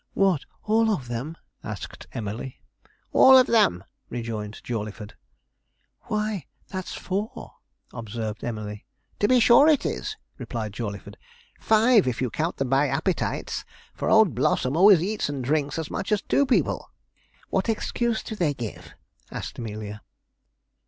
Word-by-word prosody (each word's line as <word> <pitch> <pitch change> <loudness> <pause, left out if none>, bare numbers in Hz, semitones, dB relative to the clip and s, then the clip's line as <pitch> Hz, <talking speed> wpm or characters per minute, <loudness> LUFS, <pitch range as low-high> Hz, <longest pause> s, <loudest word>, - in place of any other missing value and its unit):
'What, 190 -7 +2 0.2
all 225 +1 +3
of 150 - -1
them?' 130 +8 -5 0.3
asked - - -7
Emily. 115 +4 -5 0.5
'All 265 0 +8
of 255 - +7
them,' 90 - +3 0.3
rejoined 110 -3 -5
Jawleyford. 105 -2 -5 0.9
'Why, 210 -6 -2 0.2
that's 185 -1 -5
four,' 200 +4 -4 0.4
observed 110 -1 -5
Emily. 105 -3 -5 0.3
'To 205 - +3
be 255 +1 +5
sure 240 +5 +7
it 305 -4 +4
is,' 435 - -3 0.2
replied 115 -4 -4
Jawleyford; 105 -3 -6 0.4
'five, 220 - +4
if 125 -2 -1
you 125 -3 -1
count 165 +3 -2
them 135 -2 -1
by 140 +2 +4
appetites; - - -1 0.3
for - - -2
old - - +5
Blossom 130 +3 +1
always 185 -1 +7
eats 205 -4 -1
and 140 -3 -3
drinks 145 +2 0
as 160 -2 -4
much 195 - -3
as 210 -2 +2
two 280 - +2
people.' 255 - +1 0.6
'What - - 0
excuse 225 +1 -1
do 220 - -6
they 160 -8 0
give?' 115 -5 -7 0.3
asked - - -6
Amelia. 105 -2 -6
145 Hz, 140 wpm, -25 LUFS, -, 0.9 s, All